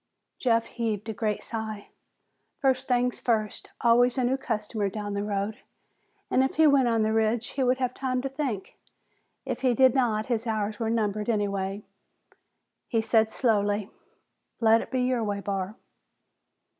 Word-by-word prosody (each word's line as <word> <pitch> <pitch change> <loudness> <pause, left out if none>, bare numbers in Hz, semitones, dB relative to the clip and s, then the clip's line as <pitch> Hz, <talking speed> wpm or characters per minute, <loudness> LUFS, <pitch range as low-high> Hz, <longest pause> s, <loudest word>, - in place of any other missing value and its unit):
Jeff 230 -2 +2
heaved 220 -3 -3
a - - -2
great 210 0 -2
sigh. 220 -2 -5 0.7
First 265 -1 +1
things 250 0 +1
first, 215 -3 -1
always 245 +2 +4
a 255 - +2
new 250 +2 +2
customer 215 -5 -2
down 205 0 -5
the 200 - -1
road, 205 +1 -2 0.7
and 260 - +4
if 265 - -1
he 315 - +5
went 280 -4 +5
on 225 -2 +2
the 220 0 +1
ridge, 225 +2 +1
he 275 - -3
would 255 0 +3
have 255 -1 -1
time 255 -1 -1
to 270 - -2
think. 265 -8 -4 0.7
If - - -3
he 255 -2 +2
did 260 0 +5
not, 225 -5 +1
his 235 -1 -2
hours 215 -1 -2
were 225 -1 -1
numbered 215 -1 -1
anyway. 200 -2 -1 1.0
He 225 -3 +1
said 220 -1 +3
slowly, 205 -4 +1 0.7
"Let 225 -1 +5
it - - -8
be 255 -1 0
your 250 -2 +1
way, 205 -1 -2
Barr." 195 0 -3
225 Hz, 165 wpm, -27 LUFS, 210-250 Hz, 1.0 s, he